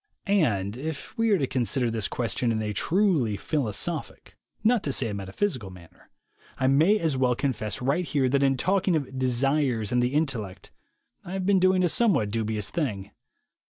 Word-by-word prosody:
And, 115 Hz, -, +1 dB
if 150 Hz, +1 st, -6 dB
we 230 Hz, 0 st, +1 dB
are 205 Hz, -, +4 dB
to 140 Hz, -, 0 dB
consider 125 Hz, -1 st, 0 dB
this 110 Hz, -3 st, -1 dB
question 115 Hz, 0 st, -1 dB
in 110 Hz, -, -1 dB
a 105 Hz, -1 st, -2 dB
truly 155 Hz, -, +1 dB
philosophic, 130 Hz, -8 st, -3 dB, 0.3 s
not 230 Hz, 0 st, +3 dB
to 140 Hz, -, -2 dB
say 125 Hz, -3 st, -1 dB
a -, -, -4 dB
metaphysical 100 Hz, -, -3 dB
manner, 90 Hz, -3 st, -16 dB, 0.5 s
I 130 Hz, -, -1 dB
may 155 Hz, +11 st, +4 dB
as 160 Hz, -8 st, -1 dB
well 125 Hz, -1 st, +2 dB
confess 115 Hz, -5 st, -2 dB
right 140 Hz, +8 st, +1 dB
here 140 Hz, -5 st, 0 dB
that 140 Hz, +2 st, +1 dB
in 135 Hz, -1 st, +2 dB
talking 185 Hz, +4 st, +1 dB
of 135 Hz, -3 st, -3 dB
"desires" 130 Hz, -3 st, +1 dB
and 125 Hz, 0 st, +2 dB
"the 125 Hz, +3 st, 0 dB
intellect" 120 Hz, -, -2 dB, 0.5 s
I 175 Hz, -, -8 dB
have 190 Hz, -1 st, -2 dB
been 195 Hz, -1 st, +4 dB
doing 185 Hz, 0 st, +3 dB
a -, -, +4 dB
somewhat 165 Hz, -, +2 dB
dubious 110 Hz, -2 st, -2 dB
thing. 105 Hz, -, -3 dB
130 Hz, 180 wpm, -26 LUFS, 110-165 Hz, 0.5 s, are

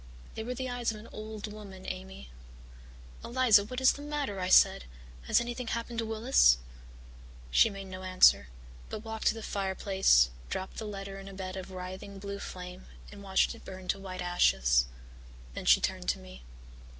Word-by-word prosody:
They 220 Hz, -, -5 dB
were 250 Hz, +2 st, -4 dB
the 260 Hz, +1 st, -3 dB
eyes 245 Hz, -2 st, -1 dB
of 215 Hz, -, -8 dB
an 220 Hz, -, -12 dB
old 215 Hz, 0 st, -7 dB
woman, 195 Hz, -3 st, -11 dB
Amy. 65 Hz, 0 st, -7 dB, 0.9 s
"'Eliza, 235 Hz, -4 st, +4 dB
what 255 Hz, +4 st, -5 dB
is 260 Hz, -, +5 dB
the 285 Hz, -, -9 dB
matter?' 290 Hz, -9 st, -3 dB
I 185 Hz, 0 st, -2 dB
said. 60 Hz, -, +6 dB, 0.4 s
'Has -, -, +4 dB
anything 240 Hz, 0 st, -4 dB
happened 230 Hz, +1 st, -3 dB
to 225 Hz, -, -2 dB
Willis?' 220 Hz, -, +4 dB, 0.9 s
"She 225 Hz, -, +6 dB
made 195 Hz, -1 st, -8 dB
no 185 Hz, 0 st, -8 dB
answer, 185 Hz, -, +5 dB, 0.4 s
but 215 Hz, -, -6 dB
walked 220 Hz, 0 st, -2 dB
to -, -, +3 dB
the 225 Hz, -, -7 dB
fireplace, 190 Hz, -, +2 dB, 0.2 s
dropped 190 Hz, 0 st, -5 dB
the 220 Hz, -, -4 dB
letter 195 Hz, -1 st, -6 dB
in 195 Hz, -, -10 dB
a 195 Hz, -, -9 dB
bed 185 Hz, -1 st, -5 dB
of 190 Hz, 0 st, -7 dB
writhing 185 Hz, +2 st, -7 dB
blue 200 Hz, 0 st, -6 dB
flame 180 Hz, 0 st, -8 dB, 0.2 s
and 205 Hz, -1 st, -11 dB
watched 190 Hz, -1 st, +2 dB
it -, -, -14 dB
burn 185 Hz, -1 st, -9 dB
to 195 Hz, -, 0 dB
white 185 Hz, -2 st, -6 dB
ashes. 65 Hz, -, +3 dB, 0.7 s
Then -, -, -6 dB
she -, -, +7 dB
turned -, -, -2 dB
to 65 Hz, -, +1 dB
me. 60 Hz, 0 st, -12 dB
195 Hz, 185 wpm, -30 LUFS, 185-220 Hz, 0.9 s, she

